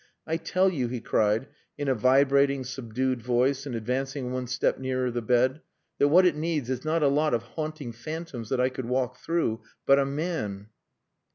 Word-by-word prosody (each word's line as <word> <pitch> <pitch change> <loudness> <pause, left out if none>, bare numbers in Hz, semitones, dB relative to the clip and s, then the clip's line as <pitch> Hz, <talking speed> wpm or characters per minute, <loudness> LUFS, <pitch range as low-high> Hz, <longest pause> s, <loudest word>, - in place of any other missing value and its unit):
I 160 +1 -1
tell 185 +3 +1
you," 130 -8 -1
he 120 +1 -4
cried, 110 +1 +1 0.3
in 145 -1 -3
a 135 - +3
vibrating, 135 +3 +3
subdued 130 0 -2
voice, 130 +4 +1
and 125 - -4
advancing 130 +3 -2
one 130 0 -3
step 125 +1 0
nearer 130 -1 -1
the 120 0 -2
bed, 125 +5 +2 0.4
"that 145 - +5
what 180 +6 +6
it 180 - +4
needs 150 -5 -2
is 130 -1 -3
not 155 +1 +1
a - - +5
lot 150 0 +2
of 115 - -2
haunting 155 0 -5
phantoms 125 -1 -6
that 130 - 0
I 125 +1 +3
could 130 -1 -6
walk 125 0 -1
through 165 -10 -1 0.2
but 140 0 +6
a 140 - +2
man!" 140 - -3
130 Hz, 190 wpm, -27 LUFS, 125-145 Hz, 0.4 s, what